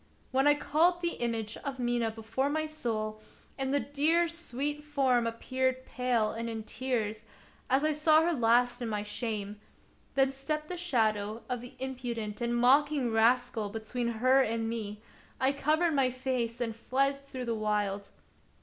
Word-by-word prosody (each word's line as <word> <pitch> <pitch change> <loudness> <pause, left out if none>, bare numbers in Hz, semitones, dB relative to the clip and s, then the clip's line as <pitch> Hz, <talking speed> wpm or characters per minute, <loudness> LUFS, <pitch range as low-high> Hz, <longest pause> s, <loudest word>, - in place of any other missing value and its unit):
When 270 +2 +3
I 290 - +6
called 340 +5 +2
the 340 -6 -2
image 225 -2 -2
of 275 -1 -5
Mina 240 -2 0
before 225 +5 -2
my 310 +1 0
soul, 220 -8 -3 0.3
and 270 -1 -2
the 285 - +3
dear, 305 +5 +2
sweet 295 -3 -4
form 265 -5 +2
appeared 260 +2 -1
pale 245 -4 0
and 230 +1 -4
in 225 -1 -4
tears, 220 -3 -2 0.5
as 265 +3 +3
I 310 0 +2
saw 310 +1 +5
her 340 +1 +2
last 245 -1 +3
in 235 - -2
my 210 -1 -2
shame, 210 -1 -4 0.5
then 270 0 +4
stepped 300 +3 -3
the 360 - -3
shadow 220 -10 0
of 250 -2 -3
the 245 - -11
impu 255 -2 -4
dent 210 -1 -5
and 240 0 0
mocking 270 +1 +4
Rascal 230 -1 +2
between 225 +3 -3
her 255 +4 +4
and 225 -2 0
me; 215 -2 -4 0.4
I 265 +1 +3
covered 310 +4 +1
my 270 -3 +3
face 250 -2 -2
and 230 -2 -2
fled 275 +4 0
through 260 -2 -6
the 235 - -1
wild. 210 -2 -1
250 Hz, 170 wpm, -30 LUFS, 225-280 Hz, 0.5 s, I